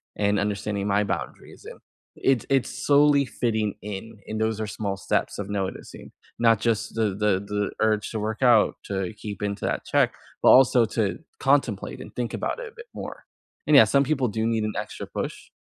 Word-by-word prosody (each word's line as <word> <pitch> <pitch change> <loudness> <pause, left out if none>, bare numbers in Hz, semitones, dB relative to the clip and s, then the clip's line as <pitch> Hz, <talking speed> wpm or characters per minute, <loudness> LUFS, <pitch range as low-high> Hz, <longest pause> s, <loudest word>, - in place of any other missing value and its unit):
and 100 0 +1
understanding 100 0 -2
my 100 +1 +2
boundaries, 100 - -6
and" - - -10 0.4
it's 130 -5 +1
it's 135 -2 +2 0.2
solely 145 -1 +5
fitting 110 -5 -1
in, 105 +2 -7
and 110 - -4
those 110 -1 0
are 110 - -2
small 100 -1 -3
steps - - -1
of 100 0 -4
noticing, 95 -2 -5 0.3
not 115 -2 +4
just 110 -2 -1
the 110 -1 +2
the 105 0 +2
the 105 0 -2
urge 110 -1 +1
to 110 - -3
work 110 +3 -3
out, 120 -4 +5
to 95 0 -3
keep 105 -2 -7
into 100 -1 -2
that - - -2
check, - - +2 0.3
but - - +6
also 125 -2 +6
to 105 -4 -1 0.2
contemplate 135 -7 +1
and - - -11
think 120 -2 -3
about - - -2
it - - -6
a 450 - -14
bit 465 +1 -11
more. - - -8 0.4
And, 150 - +5
yeah, 135 - +9
some 140 +6 +3
people 135 -3 0
do 110 0 -2
need 115 -1 0
an 105 0 -2
extra - - -5
push, - - -5
110 Hz, 195 wpm, -25 LUFS, 105-125 Hz, 0.4 s, yeah